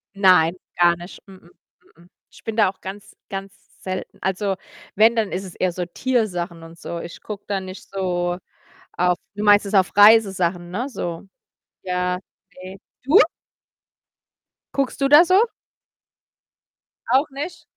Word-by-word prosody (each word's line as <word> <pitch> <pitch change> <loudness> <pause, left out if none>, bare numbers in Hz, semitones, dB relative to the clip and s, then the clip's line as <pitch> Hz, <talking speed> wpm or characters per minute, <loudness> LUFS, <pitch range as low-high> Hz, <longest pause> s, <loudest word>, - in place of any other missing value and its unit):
Nein, 180 -4 +5 0.2
gar 175 0 +5
nicht. 175 +2 -11
Mh 190 -1 -13
mh, 175 -2 -21 0.5
mh - - -19
mh. - - -21 0.2
Ich - - -18
bin 225 - -4
da 215 -4 +4
auch 190 - -12
ganz, 195 +2 -9
ganz 195 0 -6 0.3
selten. 185 0 -6
Also, 195 +1 -1 0.4
wenn, 225 +3 +5
dann 220 -3 0
ist 185 +2 -3
es 180 - -10
eher 185 -1 0
so 180 0 -4
Tiersachen 180 -6 -2
und 165 +1 -13
so. 170 - -6
Ich 170 - -9
gucke 210 -2 -8
da 200 -1 -1
nicht 185 0 -10
so 175 -2 -2 0.6
auf 180 0 +1 0.2
Du 210 - -4
meinst 205 0 +5
jetzt 200 - -2
auf 190 0 +3
Reisesachen, 190 -5 +5
ne, 240 +9 -3
so? 170 -9 -5 0.6
Ja, 180 0 -1 0.4
ne. 190 +1 -9 0.3
Du? 285 +9 +5 1.6
Guckst 275 0 -1
du 275 - +4
da 295 +5 +8
so? 370 +4 +5 1.7
Auch 265 +5 +3
nicht? 295 +6 -6
190 Hz, 155 wpm, -22 LUFS, 180-215 Hz, 1.7 s, da